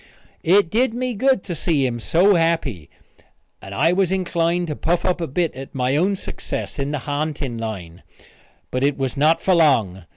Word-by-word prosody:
It 185 0 +3
did 235 +1 +1
me 250 0 -2
good 260 -1 +2
to 180 - -5
see 155 -4 0
him 120 -2 -2
so 180 - +3
happy 165 - 0 0.7
and 95 - -10
I 165 - +3
was 190 -1 +1
inclined 175 -2 0
to 150 - -3
puff 170 +4 -1
up 180 -1 0
a 165 - -2
bit 165 +4 -1
at 135 +3 -10
my 130 +1 0
own 190 +6 +2
success 185 - -5
in 140 0 -1
the 150 -1 -2
ha'nting 145 -4 -3
line. 95 -6 -6 0.7
But 130 +1 -1
it 140 0 +1
was 135 -1 -2
not 155 +4 +3
for 190 - +3
long. 115 - +2
155 Hz, 190 wpm, -21 LUFS, 130-180 Hz, 0.7 s, It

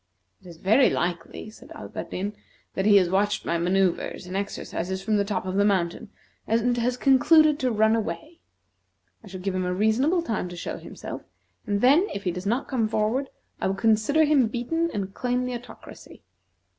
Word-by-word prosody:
"It - - -16
is 170 -2 -11
very 220 +10 +4
likely," 175 +4 -3
said - - -16
Alberdin, 200 +3 -5 0.4
"that 190 +1 -1
he 205 -1 +7
has 185 -3 +4
watched 200 +3 0
my 170 - 0
manoeuvres 180 0 0
and 180 +1 -7
exercises 190 -2 -4
from 215 0 +1
the 200 - +2
top 200 -2 -3
of 185 +1 -3
the 200 - +4
mountain, 195 +1 0 0.4
and 230 +2 +1
has 245 +1 0
concluded 300 +4 +5
to 255 - +1
run 220 -1 +3
away. 310 +9 -5 0.8
I - - -13
shall 185 -1 -8
give 195 0 -2
him 185 0 -1
a 180 0 -1
reasonable 255 - +2
time 215 - -3
to 175 - -8
show 170 - -5
himself, - - -8 0.5
and 205 -1 0
then, 290 +10 +5
if 200 - -5
he 180 - 0
does 180 +3 -6
not 240 +6 0
come 235 -5 0
forward, 220 +5 -1 0.3
I - - 0
will 190 - -1
consider 225 +9 +3
him 285 -5 +3
beaten, 285 +9 -1
and 195 -1 -4
claim 250 +1 -1
the 250 - -3
Autocracy." 240 +1 -11
215 Hz, 190 wpm, -25 LUFS, 190-250 Hz, 0.8 s, he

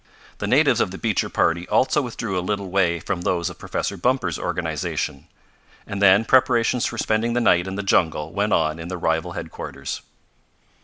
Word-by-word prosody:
The - - -2
natives - - +4
of - - +1
the - - -7
Beecher - - 0
party 85 +2 +1
also 145 +3 +3
withdrew 115 -5 -4
a 90 - 0
little 100 0 -3
way 90 -3 +2
from 85 +2 -3
those 85 0 -1
of 85 - -14
Professor 100 - -3
Bumper's 120 - 0
organization, 70 - -3 0.6
and 100 0 -5
then 100 +2 +6
preparations 125 -2 +3
for - - -6
spending 110 +2 0
the 120 - +1
night 90 -6 +3
in 95 - -4
the 100 - -3
jungle 80 -4 +1
went 105 +1 0
on 80 -2 +1
in 85 - -6
the 90 0 -4
rival 80 -1 -1
headquarters. - - -6
95 Hz, 185 wpm, -22 LUFS, 85-115 Hz, 0.6 s, then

